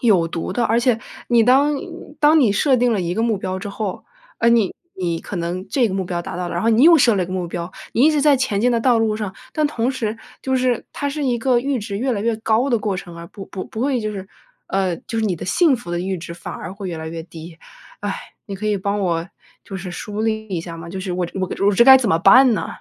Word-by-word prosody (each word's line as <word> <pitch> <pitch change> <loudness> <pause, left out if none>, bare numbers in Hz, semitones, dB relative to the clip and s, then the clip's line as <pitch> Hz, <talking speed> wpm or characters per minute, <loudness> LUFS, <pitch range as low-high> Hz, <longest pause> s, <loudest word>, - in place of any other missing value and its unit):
有 195 -8 +3
毒 165 0 -4
的。 240 - 0
而 225 +2 +2
且 245 -2 +2 0.3
你 235 -2 +5
当 280 +4 +4 0.4
当 305 +1 +5
你 235 - +4
设 260 +5 +3
定 245 -1 +2
了 205 - 0
一 175 0 -2
个 225 - 0
目 225 -4 +1
标 185 -1 -3
之 205 - -5
后， 200 -1 -5 0.3
呃， 230 - +3
你 230 -5 +3 0.2
你 170 -3 -2
可 195 - -7
能 175 +3 -3
这 245 +2 +2
个 - - -4
目 190 - -1
标 175 -1 -3
达 - - -7
到 180 -1 -3
了， - - -5
然 175 - -1
后 225 - +2
你 225 +3 +4
又 335 0 +8
设 240 -6 +4
了 190 - +1
一 - - -3
个 185 - -7
目 185 -2 -2
标， 170 +1 -5 0.2
你 240 - +2
一 310 - +6
直 300 -2 +1
在 290 -2 +5
前 215 -6 0
进 245 +1 +3
的 230 - +1
道 245 -1 +3
路 220 -1 +1
上。 205 -3 -5 0.2
但 305 -2 +1
同 245 -4 -1
时 225 -4 -3 0.3
就 265 -1 0
是， 250 -2 0
它 285 - -2
是 295 0 -3
一 245 -2 +1
个 245 +1 +2
阈 270 +1 -1
值 200 -1 -5
越 255 +3 0
来 205 - -2
越 230 0 +1
高 225 +4 +1
的 235 - +3
过 205 -2 -2
程， 175 -2 -8
而 170 - -8
不 195 +3 -10
不 190 - -6
不 220 - -7
会 260 -3 +1
就 215 0 -2
是 195 -2 -7 0.4
呃， 190 -3 0
就 225 - -6
是 220 - 0
你 180 -4 -1
的 - - -7
幸 330 - +3
福 215 -7 -9
的 175 - -1
阈 185 +1 -2
值 170 +1 -8
反 170 - -8
而 170 - -7
会 195 -2 -6
越 170 - -4
来 160 0 -6
越 165 0 -6
低。 165 0 -11 0.4
唉， 205 -1 -2 0.3
你 200 - -5
可 215 +2 -4
以 210 - +1
帮 200 +2 -1
我 170 -1 -1 0.4
就 195 - -7
是 185 0 -6
梳 205 +4 -5
理 220 -1 -1
一 180 -4 -2
下 170 0 -8
吗， 165 0 -9
就 190 - -6
是 185 -1 -4
我 180 0 -1
这 190 - -8
我 185 - 0
个 195 - -2
我 205 - +4
这 235 - +6
该 265 +1 +10
怎 240 -5 -1
么 165 - +3
办 245 +8 +7
呢？ - - -2
210 Hz, 310 characters per minute, -20 LUFS, 185-245 Hz, 0.4 s, 该